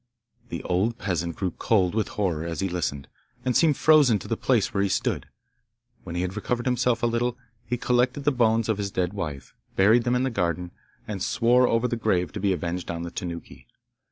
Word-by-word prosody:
The - - -5
old 100 +6 0
peasant 85 -5 -2
grew 95 -3 -2
cold 95 -4 +1
with 110 0 0
horror 90 -7 0
as 85 0 -4
he 95 - 0
listened, 75 -6 -3 0.4
and 125 -2 +1
seemed 155 -4 +4
frozen 150 -8 +5
to 95 - -9
the - - 0
place - - +1
where 100 - +1
he 100 - +1
stood. - - -1 0.8
When 85 - -7
he 90 - 0
had 90 +1 -3
recovered 120 +3 -2
himself 125 -2 +1
a - - +5
little, 120 +1 0 0.3
he 125 - -1
collected 125 +3 +1
the 145 - +3
bones 115 -3 +2
of 110 -2 0
his 100 -1 -2
dead 95 -1 -1
wife, 75 -9 -5 0.2
buried 110 +5 +5
them 120 +1 +1
in 125 - +1
the 130 - 0
garden, 85 -3 -1 0.4
and 100 -3 -4
swore 125 +2 +3
over 115 +1 +2
the 120 - -2
grave 90 -5 0
to 105 - -5
be 100 0 +1
avenged 90 0 -3
on 85 0 -3
the 85 - -6
Tanuki. 85 -9 -7
105 Hz, 215 wpm, -25 LUFS, 90-120 Hz, 0.8 s, frozen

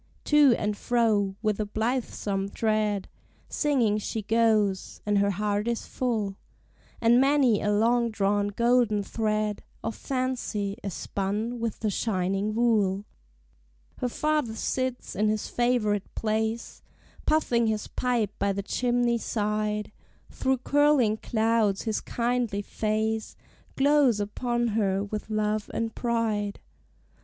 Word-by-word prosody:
To 295 -5 +5
and 210 0 -1
fro, 210 -4 +1
with 215 -1 0
a 215 - 0
blithesome 215 -3 -2
tread, 215 -2 0 0.4
Singing 245 -9 +1
she 215 +1 -4
goes, 215 -3 +1
and 205 -1 +2
her 200 0 +3
heart 205 +2 -1
is 235 -1 -1
full, 215 -6 -2 0.6
And 235 +2 +5
many 270 -6 +3
a 210 - +1
long 235 +3 +3
drawn 205 -1 +1
golden 235 -1 +2
thread 215 0 -1 0.2
Of 225 0 -3
fancy 250 -6 -2
is 195 -4 -5
spun 210 +5 -3
with 230 -2 -3
the 215 -2 0
shining 195 0 -1
wool. 210 -4 +2 0.9
Her 250 - -1
father 300 -4 0
sits 255 +2 -2
in 210 +2 +2
his 215 0 -1
favorite 230 -5 0
place, 220 +1 -2 0.5
Puffing 240 -7 +2
his 215 -1 -1
pipe 240 -5 0
by 200 0 +1
the 200 +1 -3
chimney 240 +1 +1
side; 210 -1 -1 0.4
Through 265 0 0
curling 285 -7 +3
clouds 220 -3 +1
his 220 -2 -1
kindly 235 -4 -1
face 220 +1 -2 0.4
Glows 275 -5 +4
upon 240 +3 -1
her 200 -3 +1
with 210 +1 -5
love 215 0 -1
and 225 -1 -2
pride. 220 -4 -1
220 Hz, 125 wpm, -27 LUFS, 205-240 Hz, 0.9 s, To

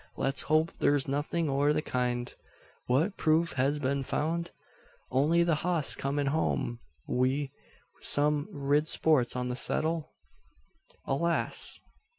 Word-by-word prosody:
Let's 135 -1 +2
hope 155 +1 +3
thur's 145 -2 +2
nothin' 145 +4 -1
o' 140 +1 +2
the 155 0 -1
kind. 125 -1 -2 0.5
What 155 +11 +1
proof 160 +2 +2
hez 135 +3 +1
been 140 0 -1
found? 160 +5 -2 0.6
Only 155 +6 +3
the 170 -1 +2
hoss 170 -4 +2
comin' 140 +1 -2
home 140 -5 -1 0.3
wi' 130 +2 0 0.5
some 145 0 +1
rid 145 +2 +1
spots 150 -8 +2
on 125 0 -2
the 125 - -2
seddle?" 160 +4 0 1.0
"Alas! 170 +5 +1
145 Hz, 125 wpm, -29 LUFS, 135-160 Hz, 1.0 s, hope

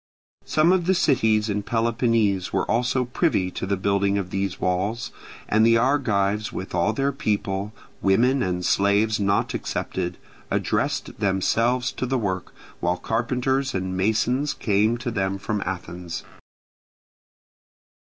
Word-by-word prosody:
Some 155 +3 +3
of 180 -2 +2
the 190 - +4
cities 110 - +2
in 105 -1 -1
Peloponnese 115 -3 +1
were - - 0
also 125 +2 +1
privy 120 - 0
to 95 - -4
the 100 0 0
building 100 +1 +1
of 95 -2 -3
these 95 -1 -2
walls; 95 +6 -1 0.4
and 110 +1 +3
the 115 0 +5
Argives 110 -6 +1
with 95 - -6
all - - +2
their 135 +5 0
people, 105 -6 -2 0.3
women 125 +8 +3
and 90 -1 -1
slaves 105 +3 +2
not 100 0 +1
excepted, 90 +1 -3 0.3
addressed - - -1
themselves 115 +5 +1
to 130 - -3
the 130 +1 0
work, 95 -6 -3 0.3
while 90 0 0
carpenters 125 +4 -1
and 95 0 -2
masons 120 +9 +1
came 105 +3 +1
to 120 +1 -4
them 95 -2 -1
from 105 +1 -3
Athens. 90 -2 -5
105 Hz, 135 wpm, -24 LUFS, 95-125 Hz, 0.4 s, the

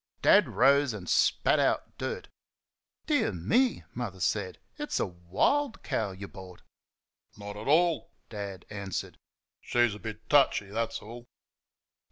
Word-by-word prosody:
Dad - - +6
rose 140 0 +4
and 95 -4 -8
spat - - +3
out - - 0
dirt. - - -4 0.8
"Dear - - +2
me!" 230 - +1
Mother 110 -6 -5
said, 95 +1 -1 0.2
"it's 295 - -2
a - - +1
WILD 95 - 0
cow 110 -3 -1
y' 95 +2 -8
bought." 95 -2 -12 0.7
"Not 100 0 -7
at 105 +3 -7
all," 165 +1 +3 0.2
Dad 100 -4 -7
answered; 100 -2 -5 0.4
"she's 120 -3 +2
a 105 - -9
bit 110 0 -8
touchy, 135 -8 +3
that's 115 +1 -2
all." 120 +3 -10
105 Hz, 135 wpm, -29 LUFS, 95-130 Hz, 0.8 s, Dad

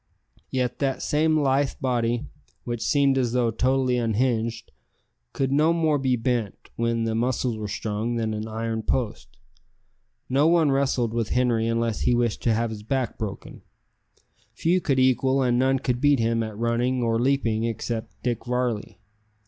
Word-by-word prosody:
Yet 125 -2 -2
that 135 -2 -1
same 155 +1 +2
lithe 135 -1 +1
body, 120 0 0 0.4
which 120 -2 -4
seemed 140 -2 +2
as 120 -2 0
though 120 -2 +2
totally 130 +2 +1
unhinged, 115 0 -1 0.6
could 135 -1 -1
no 155 +4 +3
more 160 -3 +1
be 130 -2 +1
bent, 115 -3 -1 0.2
when 115 0 0
the 115 0 -1
muscles 120 +1 0
were 110 -1 -5
strung, 110 +3 -3
than 110 -2 -1
an 110 +1 -4
iron 110 0 -3
post. 115 -1 -2 1.0
No 140 +4 +3
one 165 -3 +4
wrestled 130 -4 +1
with 115 -2 -1
Henri 120 -3 +1
unless 115 -1 0
he 120 - +2
wished 120 -2 0
to 115 - +2
have 115 0 -1
his 105 -1 -7
back 130 +3 -2
broken. 105 -4 -6 0.9
Few 180 +3 +1
could 140 -4 0
equal 130 +1 +3
and 120 -1 +2
none 135 +1 +3
could 125 -2 -2
beat 145 -1 +4
him 115 0 +1
at 110 -2 -5
running 120 +2 0
or 115 -1 +1
leaping 115 -4 +1
except 115 0 -4
Dick 120 -3 -1
Varley. 125 -3 -2
120 Hz, 165 wpm, -25 LUFS, 115-135 Hz, 1.0 s, one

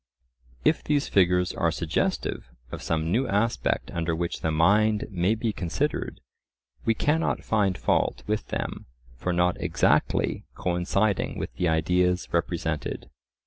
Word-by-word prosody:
If 160 - +3
these 145 -1 +1
figures 90 -2 +3
are 85 - +1
suggestive 80 -5 -2 0.2
of - - -6
some 80 0 -1
new 125 +7 +2
aspect 110 +4 0
under 80 -1 -1
which 85 +1 -3
the 80 - 0
mind 105 +7 +3
may 95 +3 +1
be 110 -1 -2
considered, 85 -4 -2 0.6
we 115 - +3
cannot 155 +8 +1
find 100 -4 +1
fault - - 0
with 105 0 -2
them - - -4 0.3
for 90 +9 -2
not 90 +1 +1
exactly - - +1
coinciding 95 +3 0
with - - -4
the 90 - -1
ideas 90 +3 +2
represented. 85 -2 -2
90 Hz, 135 wpm, -26 LUFS, 85-105 Hz, 0.6 s, If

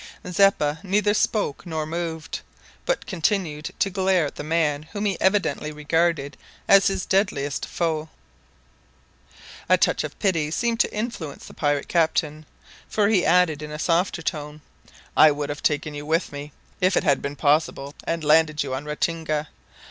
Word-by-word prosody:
Zeppa 175 -5 +3
neither 205 +2 +1
spoke 210 -7 0
nor 160 -3 -3
moved, 160 0 -4 0.5
but - - 0
continued 170 -4 -1
to 195 - +1
glare 185 -3 +2
at 145 - -5
the - - -7
man 155 -2 +1
whom 205 0 -2
he 200 -2 +1
evidently 190 -5 +1
regarded 150 -1 0 0.3
as 195 -1 +6
his 195 -1 -1
deadliest 145 -8 0
foe. 160 -2 -2 1.6
A - - +6
touch - - +2
of - - -7
pity 165 -7 +1
seemed 230 +7 -1
to - - +2
influence 210 - -5
the - - -12
pirate 145 -1 0
captain, 155 -2 0 0.4
for 205 -1 +2
he 195 -5 +3
added 165 -4 +3
in 150 - -6
a 150 - -6
softer 170 +1 0
tone, 150 -1 -4 0.5
"I 155 - +8
would 145 0 -2
have 145 0 -5
taken 150 0 0
you 145 0 -7
with 165 +3 0
me, 145 +1 -7 0.3
if 185 +1 +2
it - - +2
had 140 -2 +2
been 140 +1 -4
possible, 145 -1 +1
and 165 -1 -2
landed 155 0 +3
you 135 -2 -4
on 135 +3 -4
Ratinga. 155 0 -2
160 Hz, 165 wpm, -24 LUFS, 150-185 Hz, 1.6 s, I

